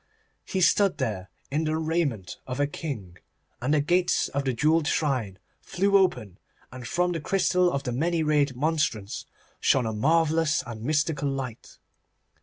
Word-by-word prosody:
He 190 - -2
stood 195 +3 +4
there 95 -4 -3 0.2
in 155 +3 0
the 155 0 0
raiment 155 - -1
of 130 +1 -4
a 145 - +3
king, 125 - -6 0.4
and 130 +4 0
the 150 -1 +3
gates 175 +4 +2
of 140 0 -2
the 130 - +1
jewelled 155 +5 +2
shrine 125 - 0 0.2
flew 200 +2 0
open, 125 - +1 0.3
and 125 -1 -8
from 180 +1 +1
the 165 -3 -3
crystal 180 +1 +2
of 140 -3 -2
the 125 - -3
many 160 +6 0
rayed 145 -3 +2
monstrance 140 -8 -1 0.3
shone 130 -3 +3
a 110 - -2
marvellous 160 +5 +2
and 115 -2 -7
mystical 145 +2 0
light. 130 -4 -6
145 Hz, 160 wpm, -26 LUFS, 125-165 Hz, 0.4 s, stood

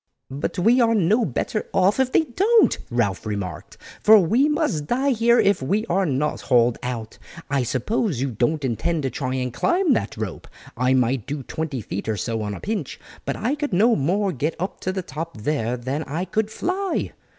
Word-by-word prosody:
"But 140 +2 -3
we 230 +8 +4
are 230 -1 +3
no 215 +4 +3
better 195 - -2
off 195 +5 +3
if 260 -1 +2
they - - +5
don't," 400 - +3
Ralph 115 -6 0
remarked, 100 -6 -5 0.2
"for 220 +1 +8
we 225 - +3
must 295 - 0
die 265 - +1
here 235 0 +4
if 200 -5 +3
we 200 +12 0
are 195 -3 +1
not 145 +1 -1
hauled 120 -2 +3
out. 115 -3 -5 0.3
I 140 -2 +2
suppose 130 - -1
you 135 0 -1
don't 135 +6 0
intend 150 +6 -1
to 135 - -1
try 130 -2 -3
and 125 -2 -2
climb 345 - +2
that 225 - -2
rope. 105 -5 -5 0.3
I 125 +2 +2
might 125 -2 +1
do 140 -1 -4
twenty 150 -3 -4
feet 100 +1 -5
or 110 - -1
so 115 +1 -2
on 105 -1 -3
a - - -8
pinch, 205 -9 -4 0.3
but - - -2
I 245 +5 -1
could 295 -6 -3
no 220 +6 +4
more 190 +8 +1
get 150 +2 -2
up 185 +3 -4
to 185 - -2
the 190 -1 -3
top 165 -3 -6
there 125 0 -1
than 130 +5 -3
I 160 +6 -3
could 210 +4 -1
fly." 370 - -2
160 Hz, 200 wpm, -23 LUFS, -, 0.3 s, for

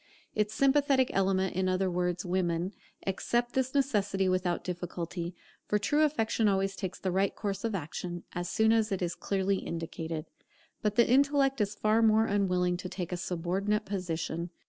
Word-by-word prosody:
Its 210 0 0
sympathetic 275 +1 +3
element, 190 -1 +1
in 185 0 +1
other 185 +1 +1
words, 180 0 -1
women, 175 0 0 0.3
accept 240 +5 0
this 260 +1 0
necessity 205 -8 +1
without 185 -1 0
difficulty; 175 0 -4 0.3
for 210 - +2
true 290 +9 +1
affection 230 -7 +2
always 195 0 +1
takes 190 -2 -4
the 190 - -2
right 190 +2 +1
course 200 -3 -3
of 225 -3 -1
action, 175 +1 -5
as 175 0 -3
soon 220 +3 +3
as 225 -1 +2
it 190 -2 -1
is 175 -1 -1
clearly 195 0 0
indicated. 165 -2 -4 0.6
But 210 -1 0
the 235 - +5
intellect 275 0 +3
is 205 0 0
far 215 +2 +2
more 220 0 +5
unwilling 180 -4 +1
to 180 0 -6
take 180 -2 -5
a - - 0
subordinate 185 +4 -1
position. 170 -3 -3
195 Hz, 170 wpm, -30 LUFS, 180-220 Hz, 0.6 s, the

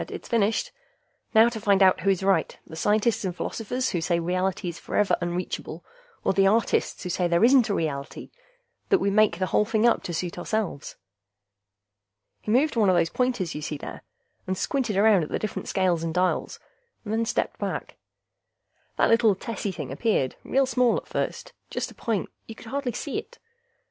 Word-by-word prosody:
"It's - - -8
finished. 225 -2 +1 0.6
Now 220 +1 +8
to 225 -2 -7
find 200 -1 +4
out 185 -1 +5
who 190 +2 0
is 190 -1 +1
right, 195 0 +1
the 160 - -11
scientists 210 +6 +1
and 185 -3 -3
philosophers 250 +7 -2
who 175 - -1
say 170 0 +1
reality 185 +2 -1
is 170 -1 -5
forever 210 -1 +1
unreachable, 175 +1 -4 0.4
or - - +2
the 195 0 +4
artists 220 +2 +1
who 180 - -4
say 180 0 0
there 170 +3 +2
isn't 245 -1 +5
any 200 - +1
reality 140 -3 -4 0.6
that 390 - +5
we 200 - 0
make 210 -4 +3
the 185 - 0
whole 210 - +2
thing 220 +1 +1
up 235 - +4
to 175 - -5
suit 175 +1 -4
ourselves." 205 -6 -3 1.5
He - - -7
moved 265 +7 +3
one 215 -4 +3
of 185 - +4
those 165 -1 +2
pointers 245 -9 -1
you 150 - -5
see 150 0 -4
there, - - -8 0.5
and 185 0 -1
squinted 240 -6 -1
around 205 -2 +5
at 155 - -4
the - - -1
different 215 - -4
scales 185 -4 +1
and 165 - -2
dials, 180 0 0 0.5
and 210 - -3
then 225 +1 +1
stepped 225 - -2
back. - - -4 1.0
That - - +3
little 225 -3 +4
tessy 205 0 -4
thing 150 -7 -6
appeared, 140 - 0
real 270 +1 +2
small 250 -2 +2
at - - -7
first. - - -4 0.2
Just - - -3
a - - -13
point; 220 -4 -2 0.2
you 225 - -8
could - - -13
hardly 260 +1 -3
see 285 - -3
it. - - -12
200 Hz, 195 wpm, -25 LUFS, 175-225 Hz, 1.5 s, Now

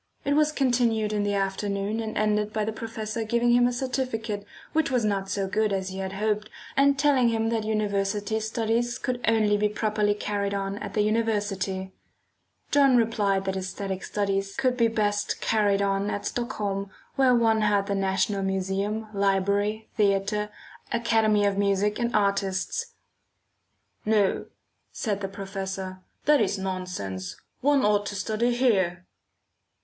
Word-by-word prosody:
It 285 - +2
was 305 +1 +3
continued 235 -6 +1
in 210 - +1
the 205 0 0
afternoon 200 +2 -1
and 220 -1 -4
ended 210 0 +1
by 215 0 -1
the 220 - -1
professor 225 0 -4
giving 235 +2 +2
him 245 0 +5
a - - 0
certificate 240 -5 -3 0.3
which 320 -2 +2
was 250 -4 +1
not 195 -2 -1
so 195 -1 -1
good 210 +2 +1
as 190 -1 -1
he 190 +1 -6
had 190 0 -4
hoped, 210 +1 -1 0.3
and 280 0 +4
telling 270 -4 +4
him 225 0 0
that 225 -2 -1
university 205 0 0
studies 230 +2 -1
could 250 -1 -3
only 215 -2 +3
be 210 0 +2
properly 210 -1 0
carried 200 -1 -2
on 195 +1 -3
at 205 -2 -6
the 210 - +3
university. 205 -4 -1 0.8
John 275 -3 +5
replied 205 -4 +1
that 190 - -1
æsthetic 190 0 -4
studies 195 -1 -1
could 255 -2 +1
be 235 -2 +3
best 205 -2 0
carried 205 -2 +2
on 195 +1 0
at 205 - -3
Stockholm 205 -5 -2 0.3
where 260 -2 +4
one 225 -2 +3
had 205 -1 +2
the 200 - -2
National 195 +1 0
Museum, 195 +3 -1
Library, 200 +2 +1
Theatre, 210 0 +1 0.4
Academy 225 -3 +2
of 200 0 +1
Music 200 +2 +1
and 235 0 -1
Artists. 200 - 0 1.1
"No," 210 -2 +2 0.4
said 205 -3 -2
the 195 - -2
professor, 190 -1 -5 0.3
"that 295 -4 +5
is 200 -1 +1
nonsense; 180 - -4 0.2
one 280 -2 +3
ought 205 -1 +2
to 205 - -4
study 220 +5 0
here." 190 -8 +1
210 Hz, 155 wpm, -26 LUFS, 195-225 Hz, 1.1 s, him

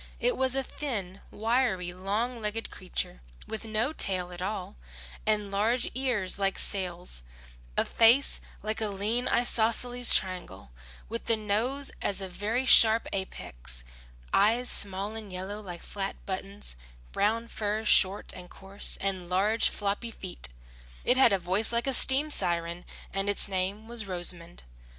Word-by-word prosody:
It - - +1
was 260 0 0
a 270 - 0
thin, 200 -11 -5
wiry, 220 -5 0
long 215 +6 -2
legged 215 +1 -3
creature, 180 - -4 0.3
with 220 +1 -5
no 220 +6 0
tail 185 - -1
at 175 0 -8
all, 190 - -4 0.5
and 210 -2 +1
large 220 +5 +1
ears 235 -8 0
like 195 -1 0
sails, 180 - -1 0.6
a - - +3
face 235 +5 +4 0.2
like 215 +1 -2
a 215 - +1
lean 210 +5 0
isosceles 240 +1 +4
triangle 180 - -1 0.4
with 230 +1 -5
the 230 - +3
nose 230 +7 -1
as 200 - 0
a 190 - -3
very 215 +7 -2
sharp 225 -3 +8
apex, - - -4 0.5
eyes 230 +5 +3
small 200 +2 -1
and 215 -3 -8
yellow 190 +3 -5
like 175 -4 -8
flat 195 -1 -4
buttons, 195 - -3 0.4
brown 225 - 0
fur 215 0 -3
short 195 -1 +4
and 180 -1 -10
coarse, 195 +1 -4
and 190 -3 -3
large 205 +5 +2
floppy 205 +3 -3
feet. 185 - -3 0.6
It 250 - +4
had 260 -3 +6
a 195 - +3
voice 190 +5 0
like 235 0 0
a 270 - 0
steam 275 +4 +4
siren 170 -4 0 0.3
and 195 +1 0
its 205 - +6
name 195 +3 -2
was 230 -3 0
Rosamund. 175 -2 0
205 Hz, 150 wpm, -28 LUFS, 185-230 Hz, 0.6 s, sharp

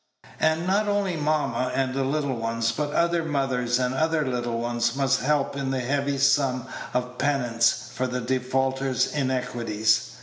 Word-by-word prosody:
And 160 +2 +2
not 200 +3 +2
only 205 -3 0
mamma 150 -4 0
and 130 -1 0
the 135 0 0
little 140 0 0
ones, 115 0 -1
but 145 +5 -2
other 170 +1 +1
mothers 130 -5 0
and 125 0 0
other 155 +2 +1
little 120 -2 -2
ones, 120 0 -1
must 135 -1 +2
help 145 0 +1
in 140 -1 -2
the 130 -1 -1
heavy 140 +2 0
sum 135 -2 +2 0.3
of 125 0 -2
penance 125 -5 +1
for 130 +1 -1
the 125 0 -2
defaulter's 130 +1 0
iniquities. 120 -5 0
130 Hz, 160 wpm, -25 LUFS, 125-145 Hz, 0.3 s, And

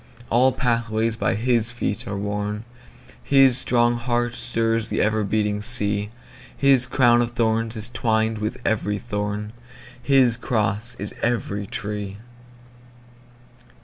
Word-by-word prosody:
All 125 +3 +4
pathways 115 -3 -1
by 95 -3 -1
his 115 0 +1
feet 120 -1 -4
are 100 -1 -4
worn, 105 +1 -3 0.6
His 135 -3 +5
strong 120 -1 +2
heart 120 0 -1
stirs 115 -1 -1
the - - -2
ever 110 0 +1
beating 105 0 -1
sea, 105 -2 +3 0.5
His 135 -3 +4
crown 120 -2 +4
of 120 0 -2
thorns 115 0 0
is 110 -1 -2
twined 110 -2 0
with 105 +1 -3
every 105 -2 0
thorn, 105 +1 -4 0.5
His 130 -4 +3
cross 110 -1 -1
is 100 +1 -6
every 105 -4 -2
tree. 105 -2 -5
115 Hz, 125 wpm, -22 LUFS, 105-120 Hz, 0.6 s, His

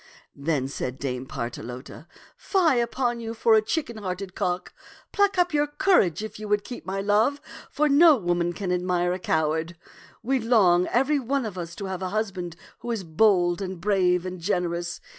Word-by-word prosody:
'* - - -45
Then 140 -5 +1
said 130 -2 -4
Dame 130 -2 -4
Partelote, 125 +5 -7 0.2
" - - -26
Fie 340 - +3
upon 240 0 -1
you 225 0 -5
for 225 0 +3
a 220 - +6
chicken 235 0 -3
hearted 190 -1 -5
cock! 180 -1 -2 0.4
Pluck 405 -1 +2
up 355 -2 +2
your 295 0 +2
courage 295 - +2
if 215 -1 -7
you 215 - -6
would 205 0 +1
keep 245 -1 -9
my 195 +1 -2
love, 210 +8 +2 0.3
for 300 - +1
no 300 +2 +7
woman 175 -3 0
can 190 0 -3
admire 180 0 0
a 185 - -4
cow 160 -3 +1
ard. 165 +2 -4 0.5
We 265 +3 +1
long, 200 -7 +4
every 270 +4 +2
one 270 0 -1
of 210 -4 -5
us, 170 -2 -6
to 200 - -6
have 190 -1 -4
a 185 - -2
husband 190 -5 -3 0.2
who 240 - -7
is 225 -5 -2
bold 175 +1 +2
and 190 -2 -5
brave 180 -2 +2
and 185 0 -5
generous. 175 -2 -2
195 Hz, 195 wpm, -25 LUFS, 175-235 Hz, 0.5 s, no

